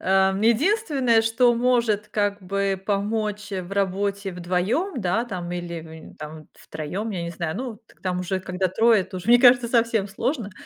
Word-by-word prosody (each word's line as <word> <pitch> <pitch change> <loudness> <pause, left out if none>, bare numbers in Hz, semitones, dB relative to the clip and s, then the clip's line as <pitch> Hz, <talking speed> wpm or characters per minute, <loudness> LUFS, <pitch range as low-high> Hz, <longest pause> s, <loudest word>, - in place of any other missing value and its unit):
Э, 190 0 +3
единственное, 260 - +2
что 240 +2 +3
может 235 -4 +1
как 205 -1 -1
бы 195 0 -1
помочь, 210 +1 -2
э, 185 - -2
в 180 +2 -10
работе 200 0 -1
вдвоём, 190 - -1
да, 200 +5 0
там, 180 -6 -6
или, 175 -1 -5
м, 160 0 -12
там 155 0 -9
втроём, 180 +9 -5
я 180 -4 -3
не 170 - -4
знаю, 170 0 -4
ну, 245 -3 -5
к - - -24
там 180 -1 -1
уже 185 +1 -2
когда 185 0 -2
трое, 225 +3 +4
это 185 0 -7
уже, 180 - -8
мне 240 +1 +7
кажется, 245 -1 +6
совсем 230 -3 +2
сложно, 230 +1 -2
200 Hz, 180 wpm, -24 LUFS, 185-230 Hz, -, мне